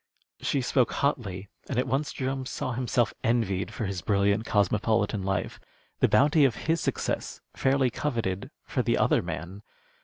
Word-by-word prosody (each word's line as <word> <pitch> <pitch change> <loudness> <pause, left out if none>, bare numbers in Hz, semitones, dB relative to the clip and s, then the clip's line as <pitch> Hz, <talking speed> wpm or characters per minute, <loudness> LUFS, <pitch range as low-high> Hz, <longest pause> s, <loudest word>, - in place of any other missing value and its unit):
She 140 - 0
spoke 125 -1 +2
hotly, 100 -9 -1 0.2
and - - -2
at 125 - +2
once 140 +2 -1
Jerome 130 0 -3
saw 130 - -3
himself 120 -1 0
envied 100 -6 0
for 115 - -3
his 95 -2 -3
brilliant 100 +1 +2
cosmopolitan 105 +1 +1
life, 95 -1 -2 0.4
the - - +5
bounty 150 +3 +5
of 135 -4 +4
his 165 +1 +1
success - - -2 0.2
fairly 135 -2 +2
coveted 115 -9 -2 0.2
for - - -1
the - - +1
other - - +3
man. 85 +7 -6
115 Hz, 155 wpm, -27 LUFS, 100-130 Hz, 0.4 s, the